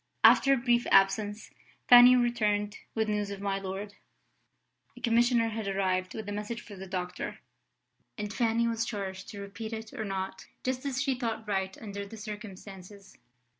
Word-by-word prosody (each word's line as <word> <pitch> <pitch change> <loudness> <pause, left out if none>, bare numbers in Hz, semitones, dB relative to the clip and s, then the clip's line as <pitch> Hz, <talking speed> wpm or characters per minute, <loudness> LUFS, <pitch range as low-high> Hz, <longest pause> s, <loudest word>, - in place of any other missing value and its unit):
After 275 - +7
a 275 - +5
brief 240 -1 +2
absence, 205 +2 +3 0.4
Fanny 245 +1 +9
returned 210 -4 +1 0.2
with 220 -1 +1
news 210 -1 -1
of 200 -1 -6
my 195 -1 -1
lord. 195 +2 -5 1.0
A - - -9
commissioner 235 -1 +3
had 220 -2 -4
arrived 185 -1 0
with 220 -2 -6
a - - -3
message 210 +3 -4
for 205 - -11
the 190 0 -8
doctor; 180 -1 -4 0.8
and 210 -1 -4
Fanny 235 -1 +1
was 230 -1 0
charged 195 -4 -5
to 205 - -8
repeat 200 +3 -7
it 220 0 -7
or 220 - -4
not, 190 -2 -4 0.2
just 255 +2 -2
as 260 -2 -2
she 275 -1 +1
thought 230 -3 -3
right 190 -2 -1
under 200 -2 -6
the 200 +3 -10
circumstances. 200 -2 -10
210 Hz, 170 wpm, -29 LUFS, 195-230 Hz, 1.0 s, Fanny